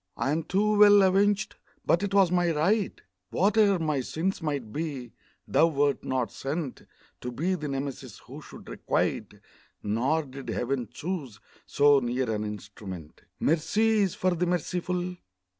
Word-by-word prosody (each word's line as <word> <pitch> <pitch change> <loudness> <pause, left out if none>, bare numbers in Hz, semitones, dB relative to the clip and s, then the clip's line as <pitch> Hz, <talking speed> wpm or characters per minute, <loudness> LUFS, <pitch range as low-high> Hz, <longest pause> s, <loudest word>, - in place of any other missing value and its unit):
I 135 - 0
am 160 +2 0
too 205 +5 +1
well 205 -1 +8
avenged! 200 +2 +2 0.3
but 165 - +3
'twas 195 -2 +2
my 175 -1 +2
right; 180 +7 +1 0.3
Whate'er 200 +1 +3
my 155 -4 -1
sins 175 +9 -2
might 140 -9 -3
be, 145 -6 -4 0.3
thou 165 - +4
wert 145 -3 0
not 125 -5 -1
sent 140 0 -5 0.3
To 125 - -5
be 170 +10 -1
the 155 -5 -3
Nemesis 135 -5 -5
who - - -10
should - - -13
requite - - -2 0.5
Nor 130 +10 +1
did 135 -1 -9
Heaven 125 -2 -2
choose 150 - -5 0.3
so 145 0 +5
near 125 -1 -1
an 105 -1 -2
instrument. 100 -5 -8 0.2
Mercy 215 +8 +2
is 195 -4 +1
for 185 -1 +1
the 175 +1 -1
merciful! 180 +1 -2
155 Hz, 145 wpm, -27 LUFS, 130-185 Hz, 0.5 s, well